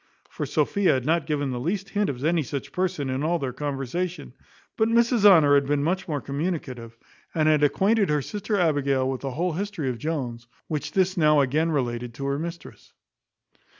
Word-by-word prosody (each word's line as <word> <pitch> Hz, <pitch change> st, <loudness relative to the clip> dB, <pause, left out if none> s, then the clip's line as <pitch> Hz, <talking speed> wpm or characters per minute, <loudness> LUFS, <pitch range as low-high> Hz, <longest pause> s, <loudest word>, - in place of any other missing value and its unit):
For -, -, -4 dB
Sophia 200 Hz, -3 st, +2 dB
had 130 Hz, -1 st, -2 dB
not 160 Hz, 0 st, +1 dB
given 145 Hz, -3 st, -1 dB
the 125 Hz, -, -3 dB
least 195 Hz, +8 st, -2 dB
hint 205 Hz, 0 st, 0 dB
of 135 Hz, 0 st, -4 dB
any 165 Hz, 0 st, +2 dB
such 140 Hz, 0 st, -5 dB
person 180 Hz, -6 st, -1 dB
in 130 Hz, +1 st, -2 dB
all 165 Hz, +3 st, +1 dB
their 135 Hz, -5 st, -4 dB
conversation; 145 Hz, +2 st, -4 dB, 0.4 s
but 220 Hz, 0 st, +2 dB
Mrs 235 Hz, -1 st, +3 dB
Honour 160 Hz, -8 st, +7 dB
had 140 Hz, -1 st, +3 dB
been 145 Hz, 0 st, +1 dB
much 185 Hz, +4 st, -1 dB
more 150 Hz, -4 st, -2 dB
communicative, 140 Hz, -6 st, -4 dB, 0.4 s
and 155 Hz, -1 st, +2 dB
had 155 Hz, -1 st, +4 dB
acquainted 195 Hz, +7 st, +2 dB
her 150 Hz, -2 st, +1 dB
sister 210 Hz, -, -3 dB
Abigail 140 Hz, -5 st, +1 dB
with 130 Hz, -1 st, -3 dB
the 135 Hz, -, -3 dB
whole 175 Hz, +6 st, -1 dB
history 190 Hz, -5 st, -3 dB
of 120 Hz, -, -7 dB
Jones, 125 Hz, -6 st, -4 dB, 0.2 s
which 150 Hz, -1 st, -4 dB
this 190 Hz, 0 st, +1 dB
now 150 Hz, -2 st, +4 dB
again 150 Hz, +5 st, +1 dB
related 120 Hz, -5 st, -2 dB
to 135 Hz, -, -5 dB
her 140 Hz, +1 st, -1 dB
mistress. 170 Hz, 0 st, -8 dB
150 Hz, 190 wpm, -25 LUFS, 135-180 Hz, 0.4 s, Honour